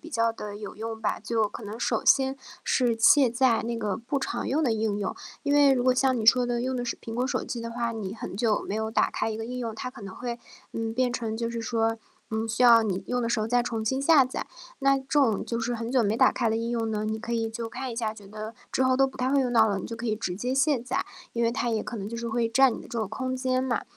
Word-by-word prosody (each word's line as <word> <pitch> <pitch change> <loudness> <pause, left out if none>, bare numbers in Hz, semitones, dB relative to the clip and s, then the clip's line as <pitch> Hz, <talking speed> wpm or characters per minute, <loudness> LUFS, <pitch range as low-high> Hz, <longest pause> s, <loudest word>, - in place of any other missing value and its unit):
比 325 - -11
较 230 -3 +2
地 210 -2 -7
有 210 -1 -8
用 225 +1 -5
吧。 220 - -1
就 220 0 0
可 225 - -9
能 215 +4 -7
首 225 -2 0
先 270 0 +4 0.3
是 245 -3 +2
卸 260 +2 +6
载 245 -1 +3
那 235 +1 -3
个 210 -4 -2
不 260 +4 -2
常 - - -3
用 305 +4 +1
的 250 - +2
应 215 -2 0
用， 200 -2 -3 0.3
因 285 - +1
为 285 -2 +6
如 250 -2 +1
果 255 0 +4
像 260 0 +2
你 220 - -2
说 250 +2 +6
的 240 -1 -1
用 255 +1 -1
的 245 - -2
是 235 - -2
苹 225 - -7
果 250 +2 0
手 - - -1
机 240 - -5
的 230 - -5
话， 235 0 -2
你 210 -3 -5
很 195 - -7
久 220 -1 +1
没 - - -2
有 220 0 -2
打 220 - +2
开 220 - -1
一 220 - -3
个 225 - -4
应 250 +1 -5
用， 230 -3 -3
它 255 +3 -5
可 245 -5 -12
能 195 -1 -8
会， 240 -1 -5 0.3
嗯， 225 0 -3
变 255 +1 +2
成 225 -3 -3
就 230 0 -2
是 235 - -4
说， 225 0 0 0.3
嗯， 220 0 -1
需 225 +3 0
要 235 -2 +8
你 195 -3 -2
用 245 0 -1
的 230 - 0
时 230 - +1
候 215 - 0
再 245 +2 +2
重 225 -2 -3
新 265 +4 0
下 285 -1 +6
载。 255 - -5 0.3
那 275 0 +4
这 265 - -10
种 265 -6 +2
就 230 - -3
是 240 +1 -1
很 230 0 -4
久 255 -2 +3
没 210 +2 +1
打 260 - +5
开 235 -3 0
的 220 - +1
应 230 +1 -2
用 230 -2 -1
呢， 215 -1 -2
你 220 +1 -2
可 235 +1 -5
以 225 -1 0
就 225 0 -5
看 260 +3 -5
一 - - -8
下 225 -2 -1
觉 205 -2 -13
得， 215 +2 -7 0.2
之 - - +1
后 255 0 +3
都 270 +1 +4
不 265 - -9
太 255 +1 0
会 280 0 +4
用 250 -2 0
到 225 -1 +6
了， 200 -2 0
你 - - -5
就 230 - -6
可 235 +1 -5
以 215 - +1
直 185 -5 -3
接 245 +6 -2
卸 275 +1 +3
载， 250 +2 -2 0.3
因 235 - -1
为 230 - +3
它 240 0 -1
也 220 -2 0
可 240 - -6
能 200 -1 -5
就 230 - -5
是 235 0 -4
会 230 0 0
占 260 +2 +5
你 - - -7
的 - - -12
这 235 - -4
个 220 - -1
空 255 +4 -3
间 255 0 0
嘛。 255 -3 -1
235 Hz, 325 characters per minute, -27 LUFS, 220-255 Hz, 0.3 s, 要